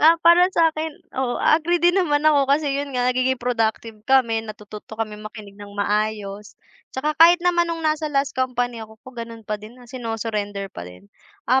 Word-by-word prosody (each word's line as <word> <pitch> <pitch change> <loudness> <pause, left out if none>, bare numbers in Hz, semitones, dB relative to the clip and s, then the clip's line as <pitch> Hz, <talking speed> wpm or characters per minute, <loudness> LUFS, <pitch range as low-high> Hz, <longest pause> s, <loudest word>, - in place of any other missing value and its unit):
ah, 320 +2 +7
para 350 +2 +7
sa'kin, 320 -3 0 0.2
oo, 255 -2 -2
a 315 - +3
agree 345 +3 +1
din 345 +1 +3
naman 295 -4 +1
ako 285 -3 +4
kasi, 285 0 +2
'yon 280 +1 -2
nga, 245 - +1
nagiging 255 +1 +1
productive 225 -2 -2
kami, 240 -4 +3
natututo 215 0 -10
kaming 215 -1 -4
makinig 210 -2 -12
ng 205 0 -11
maayos, 210 0 -2 0.3
'tsaka 300 +4 -2
kahit 340 +2 +9
naman 345 -1 +2
no'ng 330 -1 -4
nasa 310 0 0
last 275 -1 0
company 245 -2 -2
ako 220 0 -11
ko, 260 - -11
gano'n 230 -1 -8
pa 210 0 -4
din 220 +3 -12
na, 250 - -15
sinu-surrender 225 -5 -4
pa 85 +1 -8
din. 90 +1 -15 0.4
Ah, 260 +2 +3
245 Hz, 190 wpm, -22 LUFS, 215-300 Hz, 0.4 s, kahit